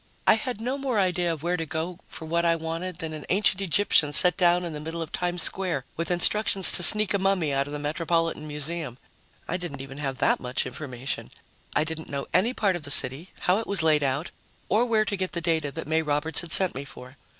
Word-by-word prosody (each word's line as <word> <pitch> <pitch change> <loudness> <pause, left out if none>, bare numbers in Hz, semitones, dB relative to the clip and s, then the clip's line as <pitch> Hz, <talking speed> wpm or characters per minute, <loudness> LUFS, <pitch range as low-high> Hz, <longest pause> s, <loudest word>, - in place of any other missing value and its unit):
I - - +6
had 225 +1 -3
no 255 +4 -3
more 260 -5 -1
idea 180 -2 0
of 160 -2 -6
where 175 +1 -1
to 165 - -4
go 165 +4 -5
for 160 - -8
what 170 +2 -1
I 170 -1 +2
wanted 165 +2 -5
than 160 -1 -4
an 155 -1 -8
ancient 195 0 +2
Egyptian 180 -5 +2
set 180 +2 +6
down 175 0 +2
in 170 - -6
the 150 - -6
middle 160 +2 -6
of 165 -2 -6
Times 175 0 -1
Square 175 -9 -1
with 165 - -4
instructions 195 +2 +5
to - - +8
sneak 210 +4 +6
a 200 - 0
mummy 190 -6 0
out 140 +1 -1
of 145 - -8
the - - -3
Metropolitan 160 +1 -2
Museum. 150 -3 -5 0.5
I 180 - -2
didn't 165 -7 -6
even 135 +1 -10
have 135 -3 -4
that - - +1
much 125 0 -3
information. 130 0 -6 0.5
I - - +2
didn't 160 0 -7
know 140 -1 -4
any 190 +8 +2
part 200 -7 0
of 175 - -6
the 140 - -7
city, 140 +6 +1
how 185 +3 +1
it 225 - -6
was 200 -5 +1
laid 155 -2 +3
out, 140 +4 -2 0.4
or 220 +5 +2
where 220 -3 +1
to 205 - -3
get 185 -1 -4
the 170 - -2
data 160 -4 -1
that - - -7
May 160 +1 +1
Roberts 150 +1 -1
had 170 -2 -8
sent 190 0 +6
me 135 - -6
for. 125 -1 -13
165 Hz, 240 wpm, -25 LUFS, 150-185 Hz, 0.5 s, to